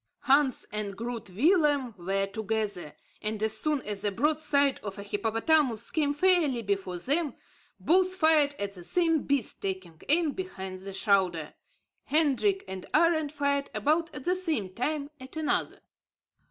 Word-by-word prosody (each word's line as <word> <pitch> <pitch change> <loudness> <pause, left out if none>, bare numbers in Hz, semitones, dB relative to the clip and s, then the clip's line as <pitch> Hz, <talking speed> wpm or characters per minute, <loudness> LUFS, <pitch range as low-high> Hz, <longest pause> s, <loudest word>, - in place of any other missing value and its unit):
Hans 275 -1 +3
and 205 -2 -4
Groot 235 -2 -5
Willem 285 - +2
were 195 +2 -1
together; 205 -5 -3 0.3
and, 215 0 -3
as 220 -1 +1
soon 300 -3 -1
as 205 -2 -4
the 205 - +1
broad 295 +9 +1
side 280 -3 +2
of 200 -1 -6
a 200 - -6
hippopotamus 225 +4 +1
came 290 -2 +1
fairly 310 -8 +3
before 195 -3 -2
them, 290 - -1 0.4
both 370 +2 +3
fired 315 -5 +3
at 200 0 -4
the 180 -3 -11
same 325 - +2
beast, 275 -5 -1
taking 185 -4 -5
aim 320 0 +3
behind 190 - -6
the 195 +1 -7
shoulder. 190 -5 +1 0.5
Hendrik 320 +7 +2
and 190 -1 -7
Arend 315 -2 +3
fired 280 -1 0
about 310 +10 +1
at 260 - -6
the 360 - +1
same 315 - -2
time 285 +5 -2
at 260 +4 -10
another. 315 -1 -1
265 Hz, 155 wpm, -28 LUFS, 200-310 Hz, 0.5 s, Hans